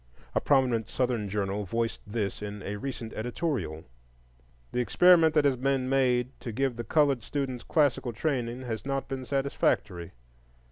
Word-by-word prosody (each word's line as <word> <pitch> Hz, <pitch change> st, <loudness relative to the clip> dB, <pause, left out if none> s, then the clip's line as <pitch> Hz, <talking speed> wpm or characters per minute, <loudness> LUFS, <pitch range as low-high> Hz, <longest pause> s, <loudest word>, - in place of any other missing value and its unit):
A -, -, +1 dB
prominent 125 Hz, -6 st, +2 dB
Southern 120 Hz, -5 st, -1 dB
journal 100 Hz, 0 st, -1 dB
voiced 115 Hz, +4 st, -2 dB
this 105 Hz, -2 st, -3 dB
in 105 Hz, -1 st, -6 dB
a 105 Hz, +1 st, -4 dB
recent 115 Hz, -1 st, -5 dB
editorial. 110 Hz, -, -3 dB, 0.9 s
"The -, -, -1 dB
experiment 160 Hz, -, +5 dB
that 150 Hz, -2 st, +4 dB
has 135 Hz, -2 st, +3 dB
been 130 Hz, 0 st, 0 dB
made 130 Hz, -2 st, +2 dB
to 120 Hz, -, -5 dB
give 130 Hz, +2 st, 0 dB
the 120 Hz, -, -4 dB
colored 140 Hz, -2 st, +2 dB
students 130 Hz, 0 st, -3 dB
classical 145 Hz, -6 st, +1 dB
training 125 Hz, -1 st, -2 dB
has 115 Hz, -3 st, -4 dB
not 135 Hz, 0 st, -2 dB
been 135 Hz, -2 st, -5 dB
satisfactory. 135 Hz, -10 st, -1 dB
125 Hz, 150 wpm, -28 LUFS, 110-135 Hz, 0.9 s, experiment